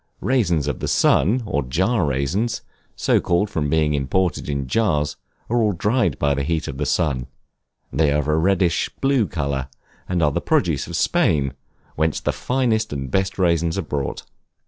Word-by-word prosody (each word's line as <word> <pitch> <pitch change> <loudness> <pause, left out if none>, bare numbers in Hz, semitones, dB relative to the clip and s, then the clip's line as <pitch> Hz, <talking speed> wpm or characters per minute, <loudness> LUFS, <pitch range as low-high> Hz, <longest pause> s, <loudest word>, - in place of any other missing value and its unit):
Raisins 90 - +1
of - - -2
the - - -3
sun, 110 - +3
or 75 -8 0
jar 90 - +1
raisins, 70 - -1 0.3
so - - +2
called 90 +4 +1
from 75 -6 -1
being 75 -1 +2
imported 75 +5 0
in 70 -2 -2
jars, 75 - +1 0.3
are 120 +1 +1
all 105 -2 +2
dried 105 - +1
by 70 -1 +1
the 70 - -1
heat 80 +2 -1
of 65 0 -6
the 75 - -1
sun; 70 -7 0 0.7
they 75 +1 +3
are 75 - +2
of 75 -1 -1
a 75 - +2
reddish 90 +1 +2
blue 135 -6 +2
color, 70 -5 -2 0.4
and 90 -2 +1
are 75 - +3
the - - -1
produce - - +1
of - - -5
Spain, 70 -4 +2 0.4
whence 80 0 0
the - - -1
finest 120 -4 0
and 70 -3 -4
best 95 +2 0
raisins 85 -2 +1
are 95 - -1
brought. 70 -3 -3
80 Hz, 180 wpm, -22 LUFS, 70-100 Hz, 0.7 s, sun